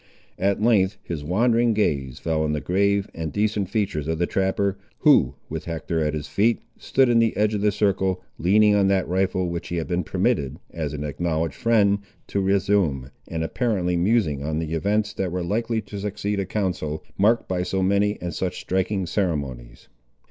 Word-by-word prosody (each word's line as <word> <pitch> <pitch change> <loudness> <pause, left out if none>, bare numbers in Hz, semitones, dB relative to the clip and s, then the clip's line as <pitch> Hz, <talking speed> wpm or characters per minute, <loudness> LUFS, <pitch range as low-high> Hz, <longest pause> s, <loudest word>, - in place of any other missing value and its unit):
At 100 +1 +1
length 105 -4 +3
his 80 -4 -5
wandering 115 +7 +2
gaze 70 - 0
fell 80 -1 -1
on 75 -1 0
the 75 - 0
grave 100 +4 +1
and 80 -2 -4
decent 105 -2 0
features 95 -8 -1
of 80 0 -1
the 85 - +1
trapper, 95 +1 0 0.3
who, 75 - +5
with - - -5
Hector 80 -1 -2
at 75 0 -1
his 75 -1 -4
feet, 110 +9 +2 0.2
stood 135 -1 +2
in 120 -1 +4
the 115 -1 +2
edge 105 +1 +2
of 105 - -1
the 105 0 +3
circle, 95 -2 +1 0.2
leaning 105 +4 +4
on 100 -1 +3
that 95 -1 +2
rifle 95 0 0
which 85 0 -4
he 85 - -3
had 80 -2 -1
been 90 0 0
permitted, 70 -2 0
as 80 -4 -4
an 75 - -4
acknowledged 80 0 -1
friend, 100 - +3 0.3
to 100 - 0
resume, 95 -9 +1 0.2
and 80 0 -3
apparently 90 -2 0
musing 85 -6 +1
on 75 +2 -2
the 80 0 -3
events 105 +6 0
that 95 -2 -2
were 90 0 -2
likely 115 +5 -1
to 100 -1 -8
succeed 100 0 -2
a 95 - -2
council, 90 -7 -2
marked 110 +4 +3
by 90 -1 -1
so 95 +1 -1
many 100 +2 +2
and 85 -2 -4
such 90 +2 -3
striking 95 +1 -1
ceremonies. 70 - -3
95 Hz, 190 wpm, -24 LUFS, 80-105 Hz, 0.3 s, who